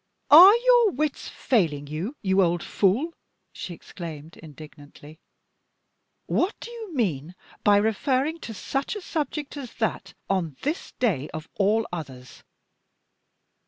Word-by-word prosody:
"Are 365 +8 +11
your 485 -2 +4
wits 300 +1 -2
failing 160 - 0
you, 160 - -5
you 190 0 +3
old 175 -2 +1
fool?" 235 - +1 0.4
she 175 - -7
exclaimed, 160 -3 -9
indignantly. 150 0 -14 1.1
"What 370 - 0
do 475 - -9
you 445 -8 -8
mean 175 - -2 0.3
by 205 -1 +5
referring 260 +9 0
to 230 - -7
such 270 - -3
a 415 - -6
subject 300 -3 -4
as 260 -4 -8
that, 220 -2 -3
on 170 -8 -1
this 300 +4 -3
day, 175 - -1
of 155 0 -7
all 215 +3 +1
others? 130 -7 -8
205 Hz, 125 wpm, -25 LUFS, -, 1.1 s, Are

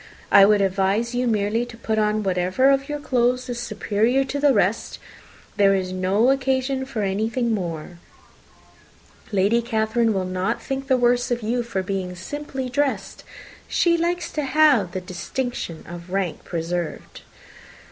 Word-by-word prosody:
I 195 - +8
would 205 0 +4
advise 195 +5 +1
you 250 0 0
merely 215 +1 +1
to 240 -1 -10
put 220 -1 -1
on 215 0 +1
whatever 185 +8 +2
of 275 +1 0
your 295 0 -3
clothes 250 -2 0
is 240 -1 -3
superior 225 +3 0
to 275 +1 -4
the 290 0 +4
rest - - 0 0.6
there 195 -1 +5
is 185 -1 -2
no 190 +7 +2
occasion 265 0 0
for 230 -6 -3
anything 220 +4 0
more. 170 -3 -5 1.3
Lady 205 +4 +2
Catherine 225 0 +1
will 190 -3 -1
not 185 +5 -2
think 270 0 -4
the 260 -1 +3
worse 245 0 +2
of 240 -2 -1
you 240 +3 0
for 230 -5 -3
being 185 -1 -3
simply 270 +6 -5
dressed. 275 +2 -2 0.4
She 340 -2 +2
likes 345 +1 -1
to 305 - -2
have 275 - +3
the 185 - -3
distinction 185 - -5
of 175 +1 -9
rank 190 -3 -2
preserved." 170 0 -4
225 Hz, 155 wpm, -23 LUFS, 190-260 Hz, 1.3 s, I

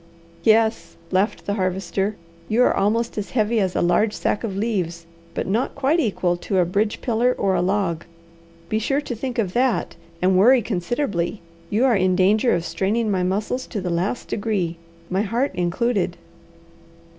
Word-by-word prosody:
"Yes," 220 0 +2 0.2
laughed 190 +4 0
the 200 - -1
Harvester. 190 +1 -1 0.3
"You 235 +3 +4
are - - +3
almost 220 +3 0
as 205 - -5
heavy 225 -1 +1
as 190 -3 0
a - - +1
large 180 +5 +2
sack 210 - -1
of 200 -4 -3
leaves, 180 -6 -2 0.3
but - - -1
not 220 +7 -1
quite 280 +5 +2
equal 185 - 0
to 190 +2 -2
a 180 - +4
bridge 205 +5 -1
pillar 245 +1 +1
or 195 - +1
a - - +2
log. 180 -3 0 0.6
Be 215 +4 0
sure 275 +6 0
to 275 - -5
think 250 +2 -4
of 195 -6 0
that, 255 -1 +1 0.2
and 185 +1 +3
worry 240 +6 +6
considerably. 200 -1 -2 0.3
You 220 +5 +2
are 250 -4 +4
in 185 -1 +2
danger 210 +6 +3
of 170 0 -2
straining 215 +4 0
my 185 -2 +1
muscles 205 +7 -1
to 215 - -4
the 180 -2 -3
last 180 +8 -1
degree, 200 -6 -1 0.3
my 190 +2 +1
heart 235 +6 0
included." 190 +4 0
205 Hz, 175 wpm, -22 LUFS, 185-230 Hz, 0.6 s, worry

